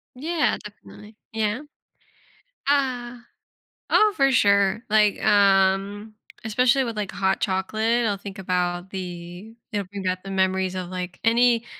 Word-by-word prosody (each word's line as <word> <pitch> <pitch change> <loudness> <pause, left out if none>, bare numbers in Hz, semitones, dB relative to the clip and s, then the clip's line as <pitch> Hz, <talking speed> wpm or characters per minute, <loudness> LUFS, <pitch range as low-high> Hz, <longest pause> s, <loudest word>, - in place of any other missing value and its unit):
Yeah, 315 +4 0
definitely. 210 +1 -13 0.2
Yeah. 220 +2 -1 1.1
Uh, 255 -4 0 0.7
oh, 425 -1 +4
for 275 -1 +3
sure. 200 -3 +3
Like, 210 -1 +3
um, 200 0 +2 0.3
especially 250 +4 +2
with, 230 -3 -4
like, 205 -2 -3
hot 190 -1 0
chocolate, 220 +5 0
I'll 205 -2 0
think 195 0 -9
about 180 -1 -2
the 180 +2 -8 0.2
it'll 205 -3 -3
bring 200 0 -7
back 185 0 -2
the 195 - -7
memories 190 -1 0
of, 180 -1 -5
like, 180 -1 -6
any 235 0 +3
205 Hz, 130 wpm, -24 LUFS, 190-230 Hz, 1.1 s, oh